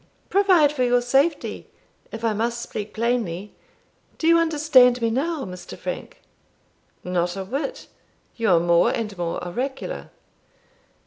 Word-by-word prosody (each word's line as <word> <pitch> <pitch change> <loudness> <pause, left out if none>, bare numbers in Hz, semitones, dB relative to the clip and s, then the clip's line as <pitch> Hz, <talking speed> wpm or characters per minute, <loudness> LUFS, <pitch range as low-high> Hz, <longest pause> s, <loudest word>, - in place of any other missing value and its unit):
"Provide 370 -7 +5
for 260 -4 0
your 245 0 +3
safety, 270 +7 0 0.4
if 225 +1 -5
I 225 - +2
must 235 +3 -1
speak 210 -2 -6
plainly. 220 -5 -2 0.6
Do - - -4
you 335 0 +6
understand 290 -6 +4
me 230 -1 0
now, 290 +4 -1
Mr. 180 -1 -9
Frank?" - - -6 0.8
"Not 180 0 -1
a 190 - -4
whit; 280 - -4 0.5
you 230 -2 0
are 175 -2 +5
more 170 0 +3
and 210 -3 -3
more 175 -2 -3
oracular." 260 +9 -4
240 Hz, 135 wpm, -23 LUFS, 200-290 Hz, 0.8 s, you